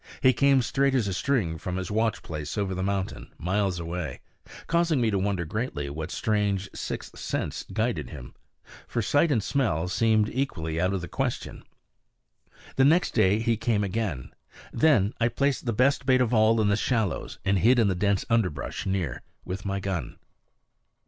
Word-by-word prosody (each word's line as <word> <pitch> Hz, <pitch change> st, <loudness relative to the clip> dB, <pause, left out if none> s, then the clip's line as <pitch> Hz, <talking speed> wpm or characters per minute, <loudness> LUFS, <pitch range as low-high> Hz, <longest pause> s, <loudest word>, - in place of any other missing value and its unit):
He 130 Hz, -2 st, +5 dB
came 135 Hz, 0 st, +4 dB
straight 135 Hz, +2 st, +1 dB
as 120 Hz, -6 st, +1 dB
a 95 Hz, -, -1 dB
string 95 Hz, -8 st, 0 dB
from 90 Hz, -, -4 dB
his 95 Hz, +2 st, -4 dB
watch 110 Hz, 0 st, 0 dB
place 75 Hz, +1 st, -5 dB
over 100 Hz, -2 st, -1 dB
the 95 Hz, -, -3 dB
mountain, 95 Hz, 0 st, -3 dB
miles 95 Hz, 0 st, 0 dB
away, 85 Hz, -4 st, -4 dB, 0.5 s
causing 170 Hz, -3 st, +2 dB
me 115 Hz, -2 st, +2 dB
to 100 Hz, -, +1 dB
wonder 95 Hz, -3 st, -1 dB
greatly 80 Hz, -, -3 dB
what 80 Hz, +3 st, -5 dB
strange 100 Hz, -2 st, 0 dB
sixth -, -, -6 dB
sense -, -, -3 dB
guided 110 Hz, -, -1 dB
him; 60 Hz, -, -9 dB, 0.5 s
for 115 Hz, -, -1 dB
sight 145 Hz, +9 st, +3 dB
and 115 Hz, -7 st, +2 dB
smell 95 Hz, -, 0 dB
seemed 110 Hz, +2 st, +2 dB
equally 80 Hz, -, -2 dB
out 90 Hz, +1 st, +2 dB
of 95 Hz, -, -2 dB
the 90 Hz, -, -6 dB
question. -, -, -3 dB, 1.1 s
The 135 Hz, -, +5 dB
next 165 Hz, +5 st, +4 dB
day 105 Hz, -3 st, +3 dB
he 115 Hz, 0 st, +1 dB
came 110 Hz, -2 st, +1 dB
again. 95 Hz, -, -3 dB, 0.4 s
Then 120 Hz, -10 st, +3 dB
I 115 Hz, -, +3 dB
placed 135 Hz, +2 st, 0 dB
the -, -, +2 dB
best 130 Hz, +4 st, +2 dB
bait 130 Hz, -1 st, +5 dB
of 125 Hz, -1 st, +1 dB
all 110 Hz, 0 st, +4 dB
in 105 Hz, -, +3 dB
the 100 Hz, -, +3 dB
shallows, 110 Hz, -, -1 dB
and 100 Hz, 0 st, +2 dB
hid 120 Hz, +8 st, +5 dB
in 115 Hz, -3 st, +4 dB
the 95 Hz, -, +2 dB
dense 100 Hz, +1 st, 0 dB
underbrush 95 Hz, -, -1 dB
near, 90 Hz, -9 st, -2 dB, 0.2 s
with 95 Hz, +2 st, -5 dB
my 100 Hz, 0 st, -1 dB
gun. 90 Hz, -9 st, -4 dB
105 Hz, 180 wpm, -26 LUFS, 90-120 Hz, 1.1 s, He